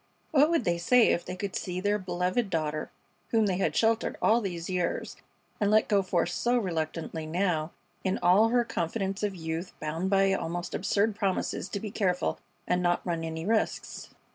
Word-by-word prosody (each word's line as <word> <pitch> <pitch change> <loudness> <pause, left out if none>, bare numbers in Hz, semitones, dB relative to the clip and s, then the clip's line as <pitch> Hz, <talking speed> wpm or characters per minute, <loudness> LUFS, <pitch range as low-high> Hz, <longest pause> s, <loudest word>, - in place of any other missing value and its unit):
What 295 +1 +5
would 335 -6 +2
they 170 -3 0
say 235 +7 +5
if 170 - +1
they 180 - -5
could 195 0 -4
see 180 -1 -3
their 205 +2 +1
beloved 185 +4 -1
daughter, 155 -3 -2 0.4
whom 225 -2 +3
they 190 -3 0
had 195 - 0
sheltered 225 0 +1
all 230 +2 +4
these 175 -5 -4
years 180 -1 -2 0.4
and 205 -2 +2
let 215 +1 +4
go 200 -1 +3
forth 180 -2 0
so 240 +7 +1
reluctantly 160 -4 -3
now, 165 -2 0 0.3
in 190 0 0
all 195 +6 +5
her 240 0 +2
confidence 195 +1 -2
of 205 -2 -1
youth, 165 +1 -4
bound 160 +5 -2
by 195 0 +4
almost 175 -1 -3
absurd 205 +2 +1
promises 195 -3 -1
to 200 - -3
be 210 0 -6
careful 185 -5 0 0.3
and 180 0 +1
not 175 0 +1
run 170 -2 -2
any 160 0 -4
risks. 220 +1 -1
185 Hz, 185 wpm, -28 LUFS, 170-210 Hz, 0.4 s, What